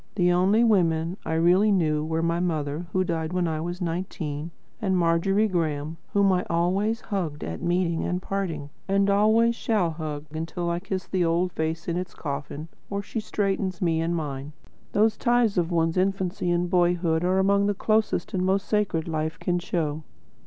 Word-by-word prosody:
The 180 -3 +3
only 190 +6 +4
women 175 -5 +2
I 160 - -1
really 180 +6 +4
knew 155 -6 +2
were 160 +1 -1
my 170 0 +1
mother, 160 -2 -2
who 185 - +2
died 165 -1 -2
when 180 -1 +1
I 155 -1 -2
was 175 +2 -4
nineteen, 165 -3 -3 0.3
and 190 -3 +1
Margery 180 +5 +2
Graem, 160 -4 -2 0.2
whom 200 -1 +4
I 180 - +1
always 195 +7 +1
hugged 170 -8 -3
at 80 0 -5
meeting 175 -1 0
and 180 - -1
parting, 175 -7 -3 0.2
and 200 0 +3
always 220 +3 +4
shall 210 -8 0
hug 155 -2 -5
until 165 +2 -3
I 170 - -1
kiss 190 -1 -4
the 185 -2 0
old 170 +2 +1
face 160 0 -3
in 170 0 -1
its 180 -1 -5
coffin, 145 +1 -5 0.2
or 200 0 -3
she 225 - -4
straightens 195 -3 -1
me 165 -2 +1
in 170 +1 0
mine. 145 -2 -4 0.4
Those 215 +1 +3
ties 240 -3 +2
of 170 -1 0
one's 165 0 +1
infancy 185 -1 0
and 175 0 +1
boyhood 175 -2 +2
are 185 +1 +2
among 200 +1 +3
the 205 - 0
closest 215 +2 0
and 185 -1 0
most 190 +1 +1
sacred 200 -7 0
life 155 -1 -2
can 175 -1 0
show. 160 -4 -2
175 Hz, 180 wpm, -25 LUFS, 160-195 Hz, 0.4 s, only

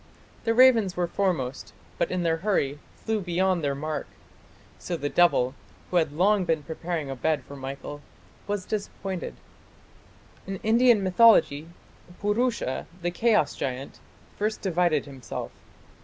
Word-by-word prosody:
The 225 0 +2
ravens 230 -7 +5
were 175 - +2
foremost, 165 -9 -2 0.3
but - - +1
in 185 -1 -1
their 165 -1 +1
hurry 160 -7 0 0.2
flew 220 -2 -2
beyond 180 -1 +1
their 140 -1 0
mark. 155 +2 -4 0.7
So 175 - -3
the 145 -1 -2
devil, 135 -8 +3 0.4
who 180 - +2
had 160 -4 +2
long 190 +6 +3
been 160 -4 0
preparing 160 -1 -4
a - - -4
bed 150 +1 0
for 140 - -11
Michael, 140 +2 -7 0.5
was 205 -2 -2
disappointed." 195 -3 -4 1.1
In 195 - -3
Indian 230 -1 +4
mythology 185 -6 +5 0.5
Purusha, 210 - 0 0.2
the 175 - 0
chaos 215 - +2
giant, 130 +1 -5 0.4
first 215 +1 -1
divided 175 -5 +1
himself. 135 -3 -7
175 Hz, 135 wpm, -26 LUFS, 145-205 Hz, 1.1 s, ravens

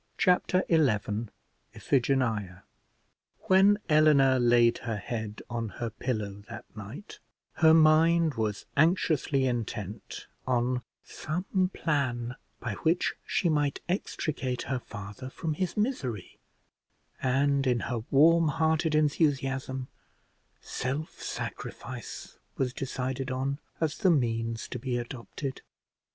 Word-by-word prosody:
Chapter 180 +1 +3
XI 160 -5 +4 0.9
IPHIGENIA 115 -8 0 0.8
When 195 +2 +5
Eleanor 150 -4 +5
laid 120 -1 +4
her 115 -3 -3
head 110 0 -5
on 115 -2 -3
her 120 -1 -3
pillow 110 -5 -3
that 115 - -8
night, 110 - -9 0.4
her 160 -1 +7
mind 160 0 +5
was 110 -3 -2
anxiously 150 -4 +2
intent 115 -4 -4 0.2
on 125 0 +1 0.2
some 185 +4 -2
plan 125 -8 -1 0.2
by 120 -3 -3
which 165 +2 +2
she 185 - +1
might 145 -3 +1
extricate 150 -8 -2
her 130 -1 -2
father 105 +2 -8
from 160 +3 -3
his 185 +6 -3
misery; 140 - -2 0.8
and, 140 +1 +2
in 125 -2 +2
her 120 0 -2
warm 165 +4 +5
hearted 160 +1 +1
enthusiasm, 135 -4 +1 0.7
self 140 +5 -4
sacrifice - - -6 0.2
was 125 -2 0
decided 130 0 -3
on 135 +2 -2 0.2
as 155 -1 -1
the 190 - +4
means 115 -6 0
to 125 - -5
be 125 0 -2
adopted. 125 +2 -6
135 Hz, 110 wpm, -29 LUFS, 120-155 Hz, 0.9 s, her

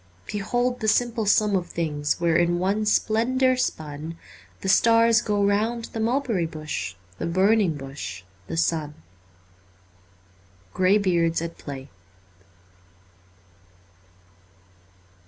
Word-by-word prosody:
Behold 245 +5 -1
the 220 - -2
simple 230 -1 +1
sum 210 0 +3
of 180 -2 -1
things 150 -3 -2
Where, 170 -1 +2
in 175 +1 +2
one 200 +4 0
splendour 255 +5 +2
spun, 155 -8 -4 0.4
The - - -4
stars 230 +2 +5
go 205 -2 0
round 220 +3 0
the 225 - -4
Mulberry 225 -6 0
Bush, 155 - -5 0.2
The - - -2
Burning 190 -1 +2
Bush, 135 -9 -7 0.2
the - - -4
Sun. 155 -3 0 0.9
' 90 +1 -32
Grey 185 +2 +4
Beards 170 -4 +1
at 165 0 -6
Play.' 135 -1 -8
180 Hz, 110 wpm, -24 LUFS, 150-220 Hz, 0.9 s, stars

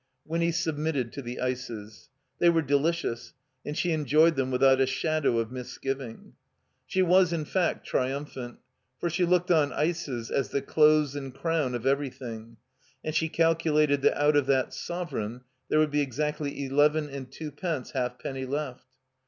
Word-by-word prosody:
Winny 170 +1 0
submitted 155 -6 -1
to 140 - -5
the 120 -1 -6
ices. 115 -6 -5 0.3
They 175 - +6
were 165 -1 +3
delicious, 145 -3 0 0.3
and 150 +1 -5
she 175 - +1
enjoyed 155 +2 +4
them 135 -1 0
without 130 +1 +4
a 135 - +3
shadow 140 -1 +1
of 115 0 -1
misgiving. 130 -1 -6 0.5
She 185 +7 +2
was, 180 0 +4
in 160 -3 -1
fact, 180 +1 0
triumphant, 130 -2 -3 0.4
for 170 - -2
she 180 +2 +2
looked 180 +1 +2
on 150 -4 +4
ices 150 -7 -2
as 135 - 0
the 140 - -1
close 150 -1 +4
and 135 -2 -5
crown 155 -4 -1
of 120 0 -5
every 140 +1 +2
thing, 115 -3 -9 0.5
and 155 - -3
she 160 +1 +1
calculated 155 -3 +2
that - - +2
out 145 +1 +4
of 145 -2 +3
that 135 -2 +2
sovereign 130 -10 -4 0.3
there - - +2
would 155 -1 +3
be 145 0 +2
exactly 145 +1 -2
eleven 150 +3 +3
and 135 -2 -8
twopence 150 0 -4
half 125 -2 -2
penny 135 -1 -5
left. 135 -2 -4
145 Hz, 165 wpm, -28 LUFS, 130-160 Hz, 0.5 s, They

